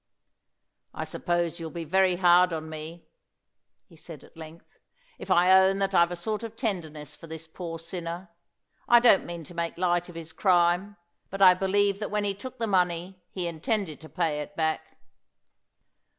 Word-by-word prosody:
"I - - -3
suppose 175 -1 -2
you'll 165 -1 -5
be 170 +1 -6
very 185 +2 +2
hard 180 0 +5
on 160 0 -5
me," 160 +2 -8 0.8
he 170 - -20
said 155 -2 -11
at - - -19
length, 160 +1 -11 0.5
"if - - -9
I 180 +2 +5
own 190 +1 +5
that 195 0 -1
I've 170 -1 +5
a 175 - -4
sort 215 +5 -3
of 225 -1 -7
tenderness 160 - -4
for 165 - -13
this 160 0 -7
poor 165 0 -7
sinner. 170 +1 -6 0.6
I 240 - +7
don't 235 -5 +4
mean 170 -1 -6
to 175 - -13
make 170 -1 -3
light 175 0 0
of 175 - -12
his 165 -1 -8
crime, 180 +2 +2 0.3
but 195 - -6
I 185 -1 +9
believe 200 +2 +1
that 210 - -4
when 210 0 -1
he 200 -1 0
took 255 +6 -9
the 230 - -1
money 180 -2 0
he 180 -2 -4
intended 170 - -2
to 160 - -12
pay 165 -5 -1
it 200 +7 -9
back." 160 -1 -2
175 Hz, 180 wpm, -27 LUFS, 165-195 Hz, 0.8 s, I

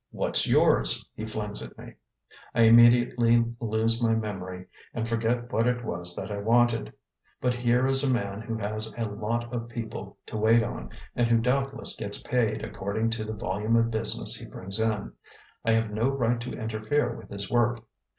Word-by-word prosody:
"What's - - 0
yours?" - - +3
he 110 - -6
flings 105 -1 -4
at 60 -1 -10
me. - - -11 0.6
I 115 - +5
immediately 120 0 +5
lose 115 +1 0
my 115 -1 +3
memory 95 -4 -5 0.3
and 115 -1 -2
forget 115 +1 -1
what 115 +2 +2
it 125 -1 -1
was 85 0 -1
that - - -5
I 100 - -3
wanted. 115 +2 +2 0.5
But 125 -1 +1
here 125 +1 +1
is 135 +1 +5
a 135 - +2
man 100 -4 -2
who 115 0 -4
has 110 +1 -3
a 115 - -1
lot 115 +3 -3
of 115 -1 -4
people 115 -1 -7
to - - -6
wait 115 +2 +4
on - - -6 0.3
and 120 -1 +2
who 115 0 +4
doubtless 135 +4 -1
gets - - -2
paid 110 -4 0
according 105 +2 -2
to 115 -1 -3
the 110 - -4
volume 105 +1 -1
of 115 0 +2
business 110 - +2
he - - -8
brings 95 +3 -2
in. 110 -2 -1 0.5
I 115 - +2
have 115 -1 +1
no 110 +5 +1
right 120 -3 0
to 120 - -6
interfere 110 +6 -1
with - - -12
his 100 -1 -6
work. 120 -1 +1
115 Hz, 185 wpm, -27 LUFS, 105-120 Hz, 0.6 s, I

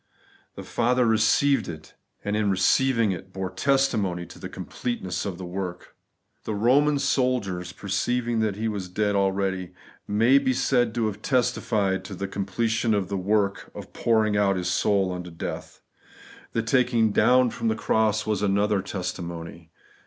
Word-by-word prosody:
The - - -7
Father 125 +1 +1
received 115 +5 +3
it; 80 -2 -9 0.3
and 105 +1 -1
in 105 -1 +1
receiving 115 +4 +3
it, 95 +1 -7
bore 95 -1 -4
testimony 105 -7 +1
to - - -13
the - - -7
completeness 110 -7 -4
of 95 -3 -5
the 95 - -7
work. 90 0 -6 0.5
The 110 - -3
Eoman 140 +7 +3
soldiers, 120 -11 0
'perceiving 115 +4 -1
that 110 -3 0
He 110 +2 -2
was 100 -4 -4
dead 105 +2 0
already,' 95 -2 0 0.3
may 115 +7 +4
be 130 -2 +1
said 120 -2 +1
to 115 -2 +1
have 105 -1 -3
testified 105 -6 0
to 100 - -7
the 100 +2 -4
completion 110 +4 0
of 100 -3 -1
the 100 - -2
work 100 +1 0
of - - -9
pouring 110 -2 +2
out 100 -1 +2
His 90 -1 -2
soul 95 -1 +1
unto 90 0 -6
deatL 85 - -7 0.7
The 115 - 0
taking 115 -2 +2
down 125 +3 +4
from - - -3
the 110 - +1
cross 110 -1 +1
was 105 -2 -1
another 100 0 +2
testimony. 85 -3 -6
105 Hz, 160 wpm, -25 LUFS, 95-115 Hz, 0.7 s, may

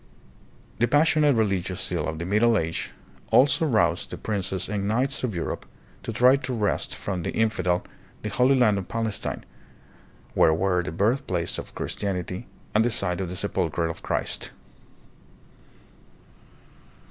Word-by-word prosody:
The 120 - +4
passionate 150 +1 +4
religious 95 -5 0
zeal - - -2
of 80 0 -3
the 85 - -4
Middle 110 +4 +3
Age 80 -2 -2 0.4
also 145 +4 +5
roused 115 -6 +2
the - - -6
princes 95 -3 -2
and 100 -1 -2
knights 130 +6 0
of 115 -7 -1
Europe 85 - -4 0.3
to - - -4
try 125 +4 +5
to 135 -2 -4
wrest 105 -3 -1
from 95 -3 -3
the - - -3
infidel 95 -6 +1 0.4
the 105 - -3
Holy 130 +4 +4
Land 110 -6 +4
of 95 - -7
Palestine, 115 -3 -3 0.9
where 80 - +5
were 90 +1 +1
the 90 - -5
birthplace 100 - 0
of - - -9
Chris - - -3
tianity 95 +1 -3 0.3
and 110 - +4
the 120 - +2
site 95 -4 0
of 90 - -3
the 90 - -5
Sepulcher 90 -4 -1
of 80 0 -4
Christ. - - -2
100 Hz, 150 wpm, -25 LUFS, 90-120 Hz, 0.9 s, also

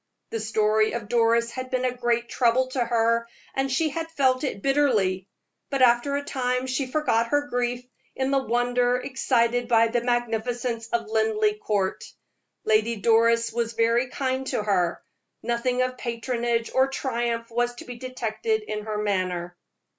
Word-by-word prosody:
The 225 - -2
story 215 0 +2
of 230 -3 -5
Doris 235 0 +2
had 255 0 -6
been 255 0 0
a 250 -1 -1
great 240 -1 0
trouble 245 +1 +2
to 255 -1 0
her, 230 0 +1 0.3
and 270 0 -1
she 310 +4 +1
had 325 +2 -4
felt 265 -4 +1
it 200 -8 -3
bitterly; 215 -10 +2 0.4
but 275 -2 +1
after 245 +3 +4
a 285 - -3
time 255 -2 -1
she 260 +1 -1
forgot 255 -5 +1
her 290 +3 +1
grief 245 0 -1 0.3
in 265 0 -1
the 275 - +3
wonder 245 0 +1
excited 245 -2 0
by 230 -1 +4
the 240 +1 0
magnificence 240 0 -1
of 235 -1 -1
Linleigh 215 -1 +1
Court. 200 -3 -1 0.6
Lady 220 +2 +2
Doris 230 +2 +3
was 235 0 -1
very 230 +2 +2
kind 260 0 -2
to 210 - -1
her; 180 -5 0 0.4
nothing 245 +1 0
of 255 0 -4
patronage 235 -1 -2
or 260 +1 +4
triumph 235 -4 -2
was 240 +1 0
to - - -10
be 245 -1 -8
detected 255 - -2
in 210 - -5
her 215 -1 -3
manner. 185 -4 -2
240 Hz, 160 wpm, -25 LUFS, 225-255 Hz, 0.6 s, after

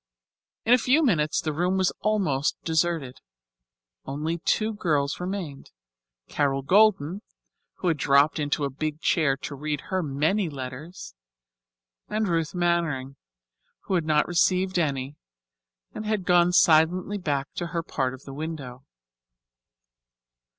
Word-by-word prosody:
In 235 - +5
a 250 - +6
few 270 +7 +3
minutes 155 - +2
the 155 - -2
room 180 +4 0
was 185 -1 +1
almost 185 -10 0
deserted. 160 -5 -1 0.8
Only 155 +5 -3
two 215 +5 0
girls 150 -8 0
remained: 180 -6 -5 0.6
Carol 135 -2 0
Golden, 190 0 +3 0.5
who 185 - -4
had 165 -3 +2
dropped 140 +3 +3
into 145 0 -1
a 140 - -1
big 155 +2 -4
chair 155 -5 +2
to 145 - -7
read 150 +1 -3
her 190 0 +1
many 160 +6 0
letters; 135 - -8 1.0
and 215 0 0
Ruth 165 -1 -1
Mannering, 165 -7 0 0.7
who - - -4
had 170 -4 +1
not 150 -1 +2
received 185 +1 +2
any 140 -3 -2 0.8
and - - -6
had 210 -4 -1
gone 175 0 +4
silently 180 +3 +3
back 140 -5 -2
to 175 - -4
her 165 0 -3
part 130 -5 -2
of 130 - -17
the 135 - -9
window. 140 -4 -6
160 Hz, 135 wpm, -25 LUFS, 140-180 Hz, 1.0 s, a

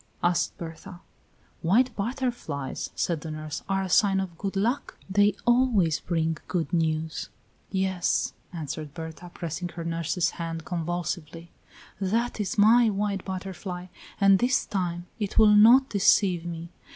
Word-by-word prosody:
asked 175 -1 +1
Berta. 175 +2 -9 0.6
"White 225 +8 +3
butterflies," 220 - -3
said 165 -4 -1
the 160 - -6
nurse, 155 -1 -5
"are 195 0 +1
a - - -3
sign 195 +1 +4
of 185 -3 -4
good 195 +3 -4
luck; 235 +8 -1
they 205 +1 +3
always 240 -10 +3
bring 165 -2 -1
good 165 -4 -2
news." 160 -1 -1 0.4
"Yes," 190 -2 0 0.2
answered 155 -3 -6
Berta, 165 +1 -8
pressing 175 +1 -4
her 170 -1 -7
nurse's 165 +1 0
hand 165 -1 -5
convulsively. 170 -1 -4 0.5
"That 225 +5 0
is 205 0 -2
my 225 +3 +6
white 200 -1 -1
butterfly, 185 -1 -6 0.3
and 195 -1 +6
this 250 +1 +2
time 175 -3 -2
it 205 -2 -3
will 215 -1 +7
not 235 +6 +7
deceive 185 -3 +3
me. 170 0 -6
180 Hz, 140 wpm, -26 LUFS, 165-205 Hz, 0.6 s, will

